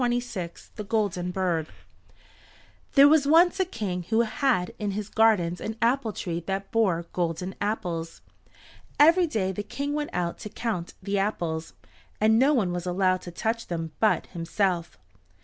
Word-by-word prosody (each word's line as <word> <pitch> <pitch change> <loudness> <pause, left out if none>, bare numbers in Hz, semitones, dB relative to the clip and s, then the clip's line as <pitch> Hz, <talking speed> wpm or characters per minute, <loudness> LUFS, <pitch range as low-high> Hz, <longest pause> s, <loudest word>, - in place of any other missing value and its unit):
THE 240 -5 -3
GOLDEN 200 -4 -1
BIRD 180 -4 -1 1.3
There 280 0 +9
was 295 -1 +4
once 345 +5 +5
a 375 - +3
King 205 - -4
who 225 +1 +3
had 230 -4 0
in 210 - -2
his 210 -1 -4
gardens 195 -6 +2
an 220 - -4
apple 235 0 +1
tree 170 -4 -4
that 195 0 -3
bore 185 -7 +1
golden 175 +1 -2
apples. 175 -6 -3 0.8
Every 335 +4 +6
day 200 -10 -1
the 190 - -4
King 275 +7 -4
went 295 0 -2
out 175 -1 -2
to 210 - -7
count 210 -7 -4
the 200 +1 0
apples, 170 -5 -2 0.5
and 220 +1 +4
no 270 +3 +5
one 215 -11 +1
was 175 0 -4
allowed 185 0 +1
to 175 - -8
touch 225 +6 -2
them 165 -2 -4
but 215 -2 +2
himself. 170 - -1
205 Hz, 155 wpm, -26 LUFS, 175-230 Hz, 1.3 s, There